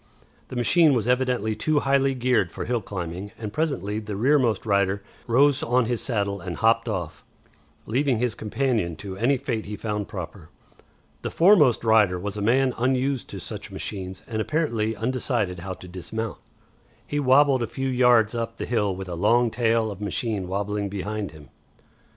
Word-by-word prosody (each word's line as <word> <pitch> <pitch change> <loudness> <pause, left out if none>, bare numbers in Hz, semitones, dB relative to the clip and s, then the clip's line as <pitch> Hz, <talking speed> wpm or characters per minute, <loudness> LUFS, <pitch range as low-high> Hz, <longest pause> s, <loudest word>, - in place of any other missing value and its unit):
The - - -8
machine 150 +5 +4
was 115 -2 0
evidently 125 -4 +1
too 145 +7 +1
highly 135 -1 +2
geared 125 -8 +1
for - - -5
hill 120 -1 -1
climbing, 95 0 -5
and 110 -2 -6
presently 110 - -1
the 105 -2 -6
rearmost 120 -2 +2
rider 100 -1 +1 0.2
rose 140 +4 +4
on 125 +1 +2
his 120 0 -1
saddle 100 -5 -2
and 85 -1 -5
hopped 115 +3 +2
off, 85 -8 -4 0.6
leaving 130 +1 +1
his 120 -1 0
companion 110 -6 -1
to 95 +4 -7
any 120 +7 +2
fate 120 -5 -3
he 105 - -4
found 105 -2 -3
proper. 90 -2 -8 0.7
The - - -3
foremost 165 - +5
rider 110 -5 +4
was 100 +2 -5
a 105 - -4
man 130 +4 +3
unused 130 +1 0
to - - -7
such - - -7
machines 95 -2 -6
and 110 -2 -3
apparently 115 -7 0
undecided 115 -5 -1
how 95 +2 -5
to 90 - -12
dismount. 95 +5 -5 0.7
He 145 - -2
wabbled 135 -1 +4
a 120 - -1
few 135 +3 -3
yards 125 -4 +4
up 115 -1 -3
the - - -4
hill 105 -5 0
with 95 0 -7
a 90 - -5
long 115 +7 +3
tail 115 -1 +1
of 100 0 -9
machine 105 -1 -2
wabbling 100 +1 -2
behind 105 +1 -4
him. 75 -2 -15
110 Hz, 175 wpm, -25 LUFS, 100-125 Hz, 0.7 s, foremost